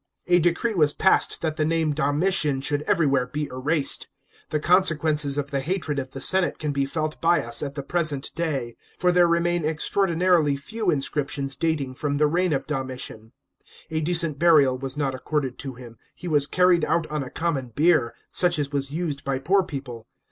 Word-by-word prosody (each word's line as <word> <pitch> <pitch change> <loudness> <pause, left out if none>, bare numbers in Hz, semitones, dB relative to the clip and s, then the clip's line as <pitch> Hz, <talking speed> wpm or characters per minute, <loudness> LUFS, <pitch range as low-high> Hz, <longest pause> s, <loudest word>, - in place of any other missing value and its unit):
A 175 0 +4
decree 175 +7 0
was 150 -6 +3
passed 190 - +2
that 155 -1 -2
the 155 - +1
name 160 -1 0
Domitian 145 0 +1
should 145 +1 0
everywl 150 -8 +2
ere 125 - -3
be 150 +4 -4
erased. 140 +3 0 0.4
The 150 - -1
consequences 155 -4 +2
of 145 0 -3
the 140 - -1
hatred 155 -1 -2
ot 130 -1 -5
the 135 - -8
senate 190 +4 +3
can 150 -2 -3
be 140 -1 -1
felt 155 +1 -4
by 170 -2 +3
us 120 0 -1
at 140 -1 -5
the 140 - -5
present 150 -3 -1
day; 140 -8 -3 0.2
for 180 0 +2
there 175 -1 +4
remain 170 0 +1
extraordinarily 165 -1 +1 0.2
lew 220 -4 -1
inscriptions 140 -2 -1
dating 150 -4 -1
from 145 +2 -2
the 150 - +3
reign 175 +4 +1
of 135 -2 -1
Domitian. 130 -5 -5 0.6
A 160 0 -1
decent 165 -3 +3
burial 150 -6 +4
was 135 +1 -5
uot 140 -3 -1
accorded 130 0 -3
to 135 -2 -6
him; 120 -2 -13 0.2
he 180 - -9
was 145 -4 +2
carried 180 +1 +3
out 165 +1 +1
on 150 -1 -2
a 130 - -6
common 155 -6 -2
bier, 145 -1 +1 0.2
such 175 -2 +2
as 145 -1 -2
was 140 -1 -2
used 150 -2 -4
by 135 -1 -1
poor 185 +9 +2
pe< 150 -7 -5
ple. 120 -4 -11
150 Hz, 195 wpm, -24 LUFS, 135-170 Hz, 0.6 s, A